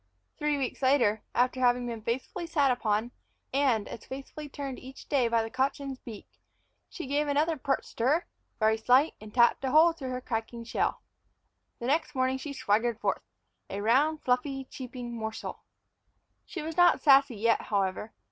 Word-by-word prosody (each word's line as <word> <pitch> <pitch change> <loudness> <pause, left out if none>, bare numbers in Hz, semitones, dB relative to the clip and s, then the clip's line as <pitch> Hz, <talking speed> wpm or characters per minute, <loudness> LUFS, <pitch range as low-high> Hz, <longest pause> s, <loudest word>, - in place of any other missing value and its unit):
Three 300 -1 +1
weeks 265 -1 -3
later, 245 -6 +3
after 250 +1 +2
having 245 -1 +3
been 230 -2 -5
faithfully 260 - -3
sat 290 -5 +3
upon, 225 -1 0 0.4
and 260 -6 +2
as 225 - -8
faithfully 275 +3 -8
turned 275 -2 -6
each 260 +1 -12
day 265 -5 +2
by 230 -1 +2
the 225 - -6
cochin's 270 0 -2
beak, 220 -4 -10 0.6
she 340 - -7
gave 290 +2 0
another 300 +3 +1
pert 270 -1 -1
stir, 285 +10 0 0.3
very 220 0 +3
slight, 255 +7 +4
and 215 0 -10
tapped 240 +3 +4
a 265 - 0
hole 320 +4 +6
through 275 -6 -6
her 255 0 -3
cracking 235 -1 -4
shell. 230 - -1 0.7
The 235 - -6
next 300 +4 0
morning 260 0 +1
she 290 +2 -6
swaggered 225 -2 0
forth, - - -1 0.5
a 195 - -4
round, 280 +9 +2
fluffy, 265 +2 0
cheeping 250 -2 -7
morsel. 220 +1 -5 0.9
She 345 - -6
was 320 +1 -5
not 350 0 +5
Sassy 275 -4 +6
yet, 230 +2 +2
however. 200 +1 -2
255 Hz, 165 wpm, -29 LUFS, 230-285 Hz, 0.9 s, hole